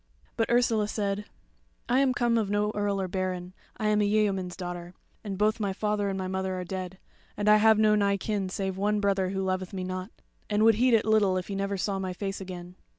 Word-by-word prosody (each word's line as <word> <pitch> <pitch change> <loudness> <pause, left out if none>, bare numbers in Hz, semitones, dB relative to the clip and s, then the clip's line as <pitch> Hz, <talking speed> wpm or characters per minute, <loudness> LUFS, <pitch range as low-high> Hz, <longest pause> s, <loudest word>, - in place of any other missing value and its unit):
But 225 - 0
Ursula 230 -3 +3
said: 205 -1 -2 0.6
"I 250 - +3
am 275 -1 +3
come 240 -1 +2
of 210 -3 -1
no 205 +1 +1
earl 205 -1 0
or 190 - -1
baron. 185 -1 -3 0.2
I 215 - 0
am 210 0 +3
a - - +3
yeoman's 200 -4 +1
daughter, 175 -1 -6 0.3
and 200 -3 -4
both 215 +3 +2
my 200 -3 -1
father 210 0 -1
and 195 - -2
my 185 -1 -3
mother 190 0 -2
are - - -3
dead, 185 0 -5 0.4
and 205 0 -1
I 210 0 +7
have 220 0 +5
no 215 0 +4
nigh 200 -1 +2
kin 200 -1 -2
save 190 0 -3
one 210 +2 +1
brother 195 -2 +1
who 195 0 -2
loveth 185 0 -2
me 185 -1 -3
not, 185 +1 -4 0.4
and 210 0 +2
would 225 0 +7
heed 250 -2 +5
it 215 - +2
little 210 -4 +3
if 185 - -4
he 200 - -3
never 195 0 -2
saw 195 +1 -1
my 185 -1 -3
face 195 +1 -4
again. 180 -1 -8
200 Hz, 230 wpm, -28 LUFS, 185-210 Hz, 0.6 s, I